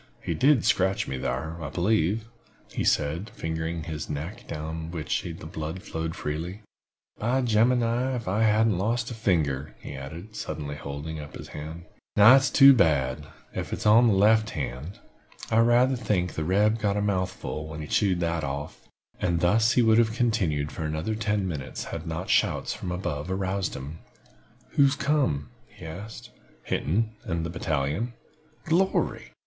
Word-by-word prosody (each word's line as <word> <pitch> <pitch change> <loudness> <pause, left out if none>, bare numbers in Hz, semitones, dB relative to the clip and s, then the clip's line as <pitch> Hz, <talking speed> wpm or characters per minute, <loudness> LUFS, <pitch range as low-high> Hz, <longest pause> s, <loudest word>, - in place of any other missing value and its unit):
He - - -1
did 140 -4 +3
scratch 95 +3 +2
me 65 - -3
thar, 80 +7 -3
I 75 - -4
believe," 100 +3 +1 0.5
he - - -2
said, 80 +9 +1
fingering 80 0 -3
his 80 -2 -5
neck, 80 +9 -5
down 80 +1 -5
which 80 -3 -2
the - - -6
blood 80 +4 -5
flowed 80 -4 -4
freely. 85 +8 -4 0.6
"By 125 +5 +1
Jemima, 120 +2 +2
ef 115 -5 -5
I 105 +4 +1
haven't 110 -3 +3
lost 115 +4 -1
a - - -3
finger!" 75 - 0
he - - -8
added, 80 +11 -8
suddenly 75 -2 -4
holding 75 +2 -6
up 75 -1 -9
his - - -9
hand. 80 +3 -7 0.3
"Now, 105 +2 +8
that's 135 +1 +6
too 140 -1 +8
bad, 75 - +2 0.3
ef - - -4
it - - -1
is - - -7
on 115 +3 +7
the 110 - +4
left 110 +2 +4
hand. 75 - -5 0.5
I 110 - +3
rayther 120 +3 +4
think 90 -7 0
the 80 - -3
reb 105 +5 +3
got 105 -2 0
a - - +1
mouthful 90 -5 -2
when 80 0 -7
he - - -5
chawed 95 -1 +1
that 85 -1 -1
off!" 70 +1 -5 0.3
And 85 -2 +1
thus 110 +7 +3
he 125 - +4
would 110 0 +5
have 110 -1 +2
continued 95 - 0
for - - -5
another 80 +7 -2
ten 105 -2 -1
minutes 75 -7 -5
had 85 0 -6
not 80 +3 -4
shouts - - +1
from 90 - -5
above 80 -3 -3
aroused 95 -1 -1
him. 70 +4 -7 0.7
"Who's 140 -1 +4
come?" 140 - 0 0.2
he - - -13
asked. 100 +7 -8 0.3
"Hinton 110 +8 0
and 85 -3 -2
the 85 - -4
battalion." 80 - -1 0.5
"Glory! 180 +4 0
90 Hz, 170 wpm, -26 LUFS, 80-110 Hz, 0.7 s, Now